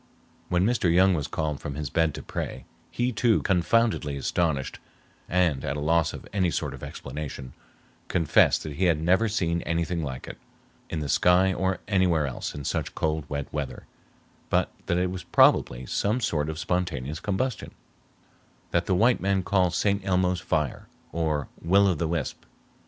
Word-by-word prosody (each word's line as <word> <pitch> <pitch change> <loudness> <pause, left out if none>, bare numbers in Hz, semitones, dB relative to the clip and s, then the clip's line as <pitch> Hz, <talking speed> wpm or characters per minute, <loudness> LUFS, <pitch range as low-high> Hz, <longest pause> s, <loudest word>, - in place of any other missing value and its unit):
When 90 +1 +2
Mr. 110 -7 +2
Young 95 +2 +5
was 75 -5 -1
called 75 -3 -2
from 70 - -5
his 75 -2 -4
bed 80 -2 +1
to 75 - -7
pray, - - -5 0.2
he, 120 +1 -1
too, 115 0 +2
confoundedly 95 -5 +1
astonished 75 -1 -1 0.5
and 85 -7 +1
at 70 - -2
a - - -3
loss 80 +2 +2
for - - -7
any 95 -3 +2
sort 75 -4 -2
of 70 - -10
explanation, 65 -2 -7 0.5
confessed 85 -4 +3
that 75 -2 -6
he 95 - +2
had 85 -4 +3
never 95 +8 +3
seen 85 -5 0
anything 85 +1 -1
like 65 -3 -6
it - - -9 0.5
in 80 - -3
the 75 - -3
sky 90 +5 +4
or 95 +1 -1
anywhere 90 -6 +2
else 65 - -5
in 70 - -6
such - - -2
cold 80 -1 -1
wet 70 -1 -3
weather, 75 -3 -4 0.6
but - - +1 0.2
that 85 - +1
it 90 0 0
was 90 -3 -6
probably - - +3
some 105 - 0
sort 80 -10 -1
of 80 - -4
spontaneous 85 -5 -2
combustion 105 +5 -2 1.0
"that 85 0 +1
the 95 - +2
white 115 +6 +3
man 95 -1 +1
called 90 -2 +2
St. 100 -1 +1
Elmo's 90 -1 +1
fire, 75 -6 -2 0.2
or 80 -3 -1
Will 100 +4 +4
of 90 -6 +1
the 85 - 0
wisp." 80 -4 -3
85 Hz, 175 wpm, -26 LUFS, 75-95 Hz, 1.0 s, Young